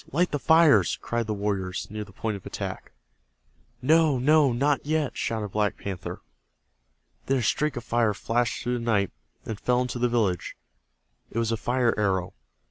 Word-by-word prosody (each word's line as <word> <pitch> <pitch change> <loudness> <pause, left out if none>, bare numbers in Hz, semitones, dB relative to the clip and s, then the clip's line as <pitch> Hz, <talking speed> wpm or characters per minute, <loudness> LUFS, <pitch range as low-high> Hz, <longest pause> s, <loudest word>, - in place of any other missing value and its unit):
Light 175 +5 +1
the 145 - -1
fires!" 145 - +5
cried 120 -1 -2
the 110 - -1
warriors 100 -2 -2
near 105 0 -4
the 105 - -14
point 110 +2 -3
of 100 - -9
attack. - - -6 0.9
"No, 155 0 +4
no, 145 +2 +4
not 140 +4 +1
yet!" 150 -2 -1
shouted 110 -2 -2
Black 105 +1 0
Panther. 95 -3 -6 1.0
Then 135 - +2
a 125 - -1
streak 150 +6 +1
of 120 - -5
fire 115 -3 +1
flashed 120 +3 -1
through 125 0 -1
the - - -6
night, 105 -5 +1 0.3
and 110 -2 -5
fell 125 0 +1
into 125 -1 -2
the 125 0 +2
village. 105 -7 0 0.7
It - - -7
was 115 -1 +1
a - - +2
fire 120 +1 +1
arrow. 95 -3 0
120 Hz, 175 wpm, -26 LUFS, 105-135 Hz, 1.0 s, fires